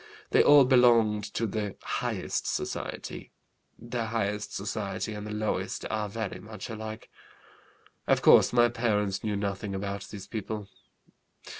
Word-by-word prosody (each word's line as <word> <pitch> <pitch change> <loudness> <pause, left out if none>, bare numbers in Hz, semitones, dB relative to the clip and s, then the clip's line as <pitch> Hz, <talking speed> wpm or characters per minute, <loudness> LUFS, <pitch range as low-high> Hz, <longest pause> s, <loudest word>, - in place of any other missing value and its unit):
They - - +6
all 145 -2 +7
belonged 120 -5 +5
to 115 - +1
the 105 -2 -3
highest - - -2
society. - - -4 0.4
The 120 -1 -4
highest 105 -2 -2
society 100 +1 -3
and 105 0 -6
the - - -5
lowest 105 0 -2
are 105 -1 -1
very 110 -1 -4
much 110 +2 -8
alike. 110 0 -7 1.0
Of - - +3
course - - +7
my 120 -1 +5
parents 105 -4 0
knew 105 -2 -1
nothing 100 0 -3
about 100 0 -4
these 100 -2 -8
people. 105 -1 -5
105 Hz, 135 wpm, -28 LUFS, 100-115 Hz, 1.0 s, all